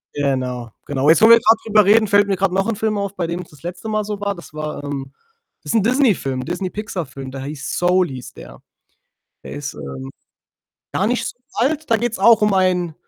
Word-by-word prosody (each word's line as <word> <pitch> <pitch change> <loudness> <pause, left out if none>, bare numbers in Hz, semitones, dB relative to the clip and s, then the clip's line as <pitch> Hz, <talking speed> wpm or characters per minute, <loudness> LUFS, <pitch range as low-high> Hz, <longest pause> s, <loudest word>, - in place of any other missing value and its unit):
Genau, 130 -4 -2
genau. 140 0 0
Jetzt, 160 - +5
wo 220 - +7
wir 230 0 +9
grad 225 0 +4
drüber 215 -2 +4
reden, 215 +2 +5
fällt 205 0 +4
mir 195 - +1
grad 195 0 +1
noch 195 +2 0
'n 230 - 0
Film 215 0 -1
auf, 200 0 -3
bei 175 -3 -2
dem 170 +2 -3
es 175 - -13
das 150 -1 -19
letzte 180 +5 -6
Mal 215 0 0
so 205 -1 -5
war. 200 -1 -2
Das 170 - -13
war, 155 -1 -5
ähm 140 -2 -5 0.5
das - - -3
ist - - 0
'n - - 0
Disney-Film, 215 - +1
'n - - -7
Disney-Pixar-Film, 175 -7 -5
der 135 0 -7
hieß 145 +1 -5
„Soul“, 180 +1 +3
hieß 130 -2 -8
der. - - -12 0.8
Der - - -9
ist, - - -5
ähm, 65 -1 -7 0.8
gar 195 - +1
nicht 245 +2 0
so - - -6 0.2
alt. 295 +4 -1
Da 225 - +5
geht's 235 +1 -2
auch 225 +2 +5
um 210 -1 +3
einen 180 -3 +1
185 Hz, 225 wpm, -20 LUFS, 145-215 Hz, 0.8 s, wir